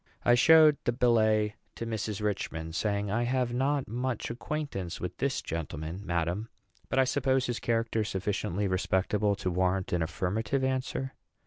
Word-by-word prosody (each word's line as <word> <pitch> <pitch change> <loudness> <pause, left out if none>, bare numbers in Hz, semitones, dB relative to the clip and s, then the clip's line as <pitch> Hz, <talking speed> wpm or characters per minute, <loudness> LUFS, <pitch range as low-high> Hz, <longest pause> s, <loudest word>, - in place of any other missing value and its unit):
I 120 - +6
showed 155 +4 +7
the - - +1
billet 110 -3 +3 0.2
to 115 - -5
Mrs. 110 -2 -3
Richman, 80 -6 -2
saying, 100 +2 -1
"I 115 +3 +1
have 125 0 0
not 135 +2 0
much 125 +2 -2
acquaintance 120 - -4
with 90 - -4
this 140 -1 0
gentleman, 80 +2 -5
madam; 85 +4 -1 0.4
but - - -1
I 135 - +6
suppose 130 0 +1
his 120 -1 -2
character 115 -1 0
sufficiently 100 -1 -1
respectable 95 +2 +1
to 95 -1 -2
warrant 95 +1 0
an 85 - +1
affirmative 100 - -1
answer." 130 0 -1
110 Hz, 150 wpm, -29 LUFS, 95-125 Hz, 0.4 s, showed